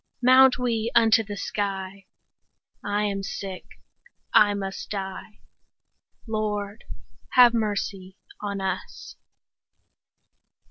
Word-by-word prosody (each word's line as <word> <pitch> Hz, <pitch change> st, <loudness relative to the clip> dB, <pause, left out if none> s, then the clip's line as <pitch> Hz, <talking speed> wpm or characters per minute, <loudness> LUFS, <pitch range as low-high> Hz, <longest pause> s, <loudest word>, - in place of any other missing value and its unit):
Mount 260 Hz, +1 st, +6 dB
we 235 Hz, -2 st, -1 dB
unto 225 Hz, -1 st, +5 dB
the 205 Hz, -1 st, -7 dB
sky; 195 Hz, -1 st, -4 dB, 0.7 s
40 205 Hz, 0 st, -3 dB
I 210 Hz, -, +1 dB
am 200 Hz, -1 st, -2 dB
sick, 195 Hz, -1 st, -6 dB, 0.7 s
I 205 Hz, -1 st, +5 dB
must 195 Hz, -1 st, -5 dB
die— 195 Hz, +1 st, -6 dB, 0.9 s
Lord, 210 Hz, -1 st, -3 dB, 0.5 s
have 245 Hz, -2 st, +7 dB
mercy 200 Hz, -4 st, -3 dB, 0.2 s
on 200 Hz, -1 st, -4 dB
us! 190 Hz, -1 st, -5 dB
205 Hz, 95 wpm, -25 LUFS, 195-220 Hz, 0.9 s, have